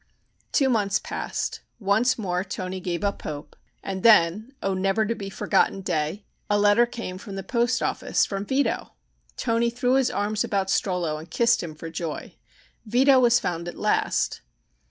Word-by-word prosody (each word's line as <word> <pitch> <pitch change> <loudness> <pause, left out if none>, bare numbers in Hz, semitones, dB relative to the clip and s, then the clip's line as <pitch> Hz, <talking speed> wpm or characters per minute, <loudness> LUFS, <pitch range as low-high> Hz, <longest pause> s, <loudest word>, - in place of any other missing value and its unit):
Two 275 - +3
months 210 -6 +2
passed, - - -4 0.2
once 215 +4 +2
more 180 -4 -1
Toni 185 -1 -5
gave 175 0 -3
up 200 0 -1
hope, 145 -1 -7 0.3
and 190 -1 -4
then, 215 +2 +5
O 195 - +1
never 195 +3 +1
to 230 - 0
be 200 -3 -6
forgotten 195 0 +1
day! 175 +1 -2 0.2
a 205 - +3
letter 205 +3 +4
came 230 -7 -6
from 200 -1 -8
the 195 - -5
post 235 +3 0
office - - +1
from 195 -1 -4
Vito! 265 +2 -1 0.4
Toni 230 +1 +1
threw 245 +2 0
his 265 -1 +3
arms 210 +1 -1
about 195 -1 -1
Strollo 175 -6 0
and 160 +2 -11
kissed 235 +6 +3
him 160 -3 -7
for 165 +1 -8
joy. 165 -1 -5 0.5
Vito 260 +4 +4
was 240 -1 +5
found 170 -4 -3
at 175 - -7
last! - - 0
200 Hz, 170 wpm, -25 LUFS, 185-235 Hz, 0.5 s, then